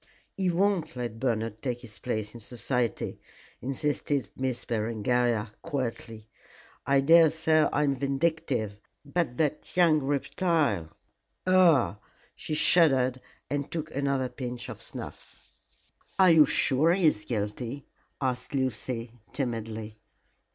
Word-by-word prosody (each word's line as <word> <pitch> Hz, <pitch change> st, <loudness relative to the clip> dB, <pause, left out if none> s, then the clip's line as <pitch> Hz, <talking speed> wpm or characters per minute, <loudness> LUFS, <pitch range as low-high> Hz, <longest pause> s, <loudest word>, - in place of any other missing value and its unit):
"He 190 Hz, -2 st, 0 dB
won't 180 Hz, -3 st, +1 dB
let 120 Hz, -3 st, -5 dB
Bernard 115 Hz, -3 st, -1 dB
take 120 Hz, -2 st, -3 dB
his 110 Hz, -4 st, -12 dB
place 110 Hz, -4 st, -3 dB
in 120 Hz, -, -9 dB
society," 120 Hz, +1 st, -2 dB, 0.4 s
insisted 140 Hz, +1 st, -1 dB
Miss 130 Hz, -2 st, -3 dB
Berengaria, 115 Hz, 0 st, 0 dB
quietly. 115 Hz, -7 st, -4 dB, 0.6 s
"I 140 Hz, 0 st, +4 dB
daresay 160 Hz, 0 st, +5 dB
I 150 Hz, -, +1 dB
am 140 Hz, -2 st, +2 dB
vindictive, 135 Hz, -6 st, -1 dB, 0.3 s
but 145 Hz, -4 st, -1 dB
that 155 Hz, +2 st, -2 dB
young 165 Hz, -4 st, +5 dB
reptile 140 Hz, -, 0 dB, 0.6 s
ugh!" 175 Hz, -, +4 dB, 0.4 s
She 155 Hz, -, -4 dB
shuddered 130 Hz, -7 st, +4 dB, 0.3 s
and 145 Hz, 0 st, -3 dB
took 155 Hz, -2 st, -5 dB
another 135 Hz, -2 st, 0 dB
pinch 125 Hz, -2 st, -6 dB
of -, -, -8 dB
snuff. -, -, -10 dB, 0.8 s
"Are 185 Hz, -2 st, +6 dB
you 160 Hz, -2 st, +7 dB
sure 155 Hz, +5 st, +3 dB
he 185 Hz, -1 st, +1 dB
is 105 Hz, -9 st, +3 dB
guilty?" 115 Hz, +4 st, -4 dB, 0.3 s
asked 125 Hz, 0 st, -2 dB
Lucy, 120 Hz, -2 st, -2 dB, 0.2 s
timidly. 110 Hz, -4 st, -4 dB
130 Hz, 115 wpm, -28 LUFS, 115-155 Hz, 0.8 s, you